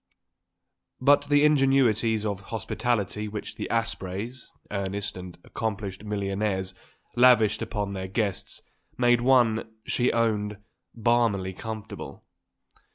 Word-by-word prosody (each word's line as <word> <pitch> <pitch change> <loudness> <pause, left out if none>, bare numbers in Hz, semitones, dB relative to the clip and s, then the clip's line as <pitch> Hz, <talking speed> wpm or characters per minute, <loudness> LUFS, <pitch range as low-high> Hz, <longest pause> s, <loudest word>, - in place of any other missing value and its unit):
But 145 +2 +4
the 145 0 +5
ingenuities 130 -7 +3
of 100 -1 -3
hospitality 105 -2 -2
which 105 0 -6
the - - -4
Aspreys 115 +1 -3 0.2
earnest 100 0 -3
and 90 -1 -9
accomplished 105 -3 -4
millionaires 100 -2 -2 0.4
lavished 115 -4 +5
upon 105 -3 -3
their 95 -1 -4
guests 100 0 -3 0.3
made 120 -1 +4
one, 120 -3 +3
she 125 0 +1
owned, 105 -3 0 0.4
balmily 115 -5 +1
comfortable. 110 +2 -7
110 Hz, 100 wpm, -26 LUFS, 100-120 Hz, 0.4 s, the